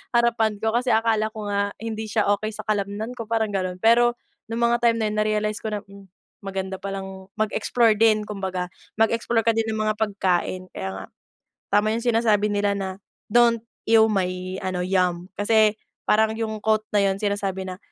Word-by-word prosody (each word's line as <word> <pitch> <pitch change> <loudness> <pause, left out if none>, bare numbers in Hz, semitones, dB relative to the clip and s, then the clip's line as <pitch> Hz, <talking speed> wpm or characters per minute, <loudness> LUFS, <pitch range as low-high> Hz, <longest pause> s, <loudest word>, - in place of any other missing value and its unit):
harapan 230 -3 +2
ko 220 0 0
kasi 245 +1 +1
akala 220 -1 +2
ko 215 -2 -6
nga 200 0 0
hindi 220 0 -4
siya 215 -1 +1
okey 215 +2 -4
sa - - -7
kalamnan 210 +3 -2
ko 230 - -4
parang 220 -2 0
gano'n. 185 -1 -2
Pero, 240 +3 +4 0.3
nung 230 +1 -2
mga 235 0 +1
time 230 -1 +4
na 220 - +1
yun 210 - -4
na-realize 215 0 0
ko 220 - -3
na, 210 - -1
hmm, 200 0 -15 0.4
maganda 190 -1 -4
palang 190 -1 -6
mag-explore 220 +1 +2
din 215 -1 +4
kumbaga, 190 -3 -3 0.3
mag-explore 230 0 +2
ka 230 - +5
din 225 - +1
ng 220 - -3
mga 215 0 +1
pagkain 185 -3 -1
kaya 95 - -3
nga 95 - -7 0.7
tama 215 +1 +3
yung 235 - -3
sinasabi 225 -3 +3
nila 205 0 +1
na, 195 -1 -3 0.4
"Don't 235 -1 +4 0.3
ew 220 -1 +6
my," 185 -1 -2
ano 185 -1 -2
"yum." 180 -1 0
Kasi 215 0 +4 0.3
parang 220 +1 +3
yung 220 -1 -3
quote 215 0 +1
na 205 - +4
yun 195 0 +1
sinasabi 200 -2 -1
na, 185 -1 -6
215 Hz, 185 wpm, -24 LUFS, 195-225 Hz, 0.7 s, ew